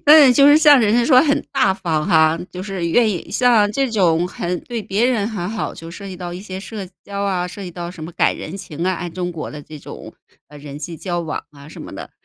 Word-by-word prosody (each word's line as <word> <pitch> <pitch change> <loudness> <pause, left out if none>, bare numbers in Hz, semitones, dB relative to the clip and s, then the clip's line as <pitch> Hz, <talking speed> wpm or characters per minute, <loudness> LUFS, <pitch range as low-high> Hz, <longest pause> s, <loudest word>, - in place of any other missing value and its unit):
嗯， 295 -4 +8
就 280 +3 +6
是 295 +1 +7
像 295 -4 +7
人 215 -2 +2
家 240 0 +3
说 255 0 +6
很 285 -2 +2
大 260 -8 +3
方 165 -5 -2
哈， 160 0 +4
就 180 - -7
是 190 -3 -3
愿 230 +6 +3
意 185 -5 -4
像 230 -5 +3
这 270 +3 0
种 175 -5 +2
很 180 0 -3
对 235 -3 -5
别 205 +5 +1
人 225 -4 0
很 195 -6 -4
好， 220 0 -3
就 165 0 -10
涉 200 +3 -9
及 185 - -7
到 175 -1 -6
一 180 - -7
些 190 -2 -7
社 200 0 -7 0.2
交 200 0 -4
啊， 185 -3 -1
涉 200 +3 -9
及 180 - -6
到 175 0 -6
什 170 -3 -11
么 165 - -6
赶 - - +1
人 165 +6 -7
情 170 -4 -6
啊， 185 - +1
按 175 -1 -6
中 180 0 -3
国 165 -3 -6
的 150 -1 -9
这 155 +1 -11
种， - - -10 0.4
呃， 150 - -13
人 145 0 -9
际 165 +1 -6
交 175 +1 -3
往 160 -2 -5
啊 140 0 -14
什 - - -11
么 - - -9
的。 - - -8
185 Hz, 280 characters per minute, -19 LUFS, 170-220 Hz, 0.4 s, 嗯